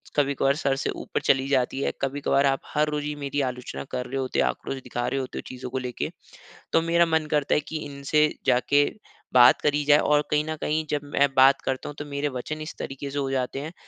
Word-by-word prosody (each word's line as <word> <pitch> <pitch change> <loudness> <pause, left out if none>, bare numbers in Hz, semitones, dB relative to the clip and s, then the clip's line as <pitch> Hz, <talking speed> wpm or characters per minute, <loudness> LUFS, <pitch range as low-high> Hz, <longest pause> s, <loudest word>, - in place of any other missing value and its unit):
कभी-कभार 140 -1 +2
सर 140 -3 0
से 135 - -2
ऊपर - - -4
चली 135 0 +2
जाती 135 -1 +1
है, - - 0
कभी-कभार 140 0 +1
आप 135 -1 +2
हर 150 0 +2
रोज 150 -1 -2
ही 150 0 -3
मेरी 145 0 -2
आलोचना 125 0 -7
कर 125 0 -3
रहे 130 +2 -4
होते 130 -1 -1
आक्रोश - - -2
दिखा 120 0 -3
रहे 135 - -1
होते 130 -1 -5
हो - - -3
चीज़ों 130 0 -7
को 130 - -3
लेके, 125 -2 -3 0.6
तो - - +5
मेरा 170 +1 +3
मन 160 -1 +1
करता 150 -2 +2
है - - +3
की 160 - -4
इनसे 145 +2 +1 0.2
जाके 135 +3 +4 0.5
बात 125 -1 +7
करी 145 0 +1
जाए 145 0 +6
और 150 -1 +3
कहीं 150 0 +2
न 155 - -1
कहीं 155 +1 0
जब 150 - 0
मैं 145 0 +2
बात 135 +1 +6
करता 130 -1 -2
हूँ। 150 - -7
तो 145 - -4
मेरे 145 0 -2
वचन 140 +4 -5
इस 155 - -6
तरीके 135 +1 -5
से 145 - -4
हो 135 -1 -1
जाते 130 0 -2
हैं 155 +3 -6
140 Hz, 235 wpm, -25 LUFS, 130-150 Hz, 0.6 s, बात